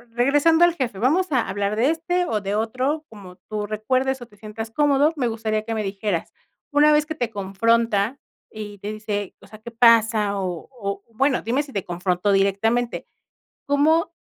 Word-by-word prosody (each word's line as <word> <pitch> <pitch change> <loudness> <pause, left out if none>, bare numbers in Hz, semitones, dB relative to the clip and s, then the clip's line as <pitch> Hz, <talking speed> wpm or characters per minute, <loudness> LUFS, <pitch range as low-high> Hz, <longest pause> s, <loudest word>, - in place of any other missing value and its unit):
regresando 290 +7 +4
al 345 - +2
jefe, 250 - -3
vamos 310 - +1
a 255 -4 +1
hablar 200 +1 -1
de 245 +7 +3
este 355 +2 -1
o 215 -9 -1
de 200 +1 -2
otro, 255 +8 -1
como 195 -4 -12
tú 210 -1 -3
recuerdes 255 +5 -1
o - - -7
te 210 - -22
sientas 220 +1 -7
cómodo, 290 +3 +3
me 260 -5 0
gustaría 220 -1 -2
que 225 +1 -4
me 215 - -1
dijeras, 195 -3 -3 0.4
una 295 +1 +5
vez 300 0 +3
que 315 - -4
te 245 -7 -2
confronta 225 +3 +1 0.3
y 210 -2 -8
te 205 +2 -5
dice, 210 -2 -4
o - - -15
sea, 215 +1 -13
¿qué 220 - -9
pasa? 225 -3 +4
O 180 -3 -4
o 200 -5 -5
bueno, 270 +3 +1
dime 250 +5 +1
si 285 - -10
te 200 - -3
confrontó 180 +2 -1
directamente, 200 +5 +1 0.6
¿cómo 315 +4 +2
225 Hz, 185 wpm, -23 LUFS, 205-275 Hz, 0.6 s, una